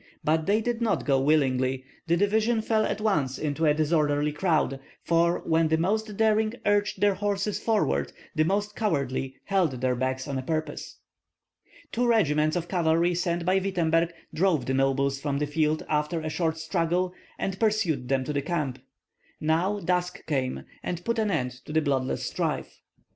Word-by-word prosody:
But 160 +2 +1
they 210 +2 +3
did 240 +1 -2
not 230 - 0
go 135 -2 +3
willingly; 130 -3 +2 0.2
the 170 +1 +3
division 220 +3 +2
fell 220 -1 +2
at 205 - -2
once 155 -12 0
into 155 +1 0
a 150 - +5
disorderly 150 -1 +1
crowd, 150 -4 0 0.2
for 170 +1 +2
when 160 0 +3
the 160 +1 +2
most 210 +4 -1
daring 220 0 +2
urged 205 0 +1
their 205 -1 +4
horses 200 +1 -1
forward 220 -2 +1 0.2
the 155 -2 +2
most 205 +4 -1
cowardly 135 - -1
held 190 -7 +1
theirs 125 -1 0
back 130 +1 -1
on 135 -2 -2
purpose. 155 +3 -4 0.9
Two 245 +1 +1
regiments 155 -9 +3
of 175 -1 -2
cavalry 170 -1 +2
sent 170 -1 -1
by 185 +2 +3
Wittemberg 170 -3 +1 0.2
drove 165 -6 +2
the 130 - -1
nobles 135 +1 +1
from 140 -1 -1
the 150 - 0
field 155 +1 0
after 150 +2 0
a 155 - -3
short 160 0 -1
struggle, 170 +2 0 0.2
and 190 -1 -3
pursued 205 - +1
them 135 -1 +1
to 150 - -3
the 140 - 0
camp. 150 -4 -2 0.6
Now 170 +7 +1
dusk 180 0 -1
came, 130 - -1 0.2
and 175 0 -4
put 235 0 0
an 215 -1 +1
end 125 -9 0
to - - -8
the 160 - +3
bloodless 135 -3 0
strife. - - -3
165 Hz, 170 wpm, -27 LUFS, 145-195 Hz, 0.9 s, a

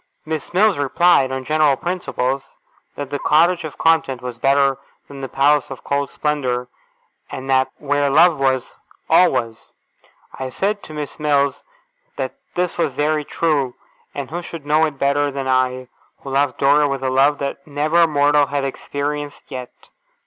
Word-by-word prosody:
Miss 155 -2 -4
Mills 195 -2 +3
replied, 145 -1 +3
on 130 0 -4
general 155 -1 +3
principles, 135 -5 -3 0.4
that 145 -1 -6
the 145 - -2
Cottage 170 +5 +3
of 155 -3 -7
content 160 -6 +2
was 125 -1 -7
better 135 0 +3 0.3
than 140 -1 -10
the 135 - -5
Palace 140 +2 +2
of 135 - -9
cold 140 0 -1
splendour, 130 -5 -2 0.6
and 130 0 -7
that 130 0 +3
where 145 -1 0
love 155 +2 +5
was, 130 -2 -1 0.3
all 180 +3 +6
was. 115 -3 -4 0.6
I 130 -1 -5
said 200 +9 -1
to 155 - -10
Miss 150 -1 -6
Mills 140 -2 +1 0.5
that - - -3 0.2
this 180 -1 -1
was 145 - +1
very 150 +1 +1
true, 145 -5 -1 0.4
and 140 -1 -5
who 175 +2 -3
should 165 -3 -9
know 155 +2 +3
it 145 -3 -8
better 140 +1 +1
than 135 -1 -4
I, 130 -1 +1 0.4
who 135 - -7
loved 140 -1 +1
Dora 145 +2 +4
with 135 -1 -3
a 130 - 0
love 140 +3 +3
that 140 0 -5
never 155 +4 +2
mortal 145 -1 +3
had 140 0 -2
experienced 145 +2 -4
yet? 125 -1 -6
140 Hz, 165 wpm, -20 LUFS, 135-150 Hz, 0.6 s, all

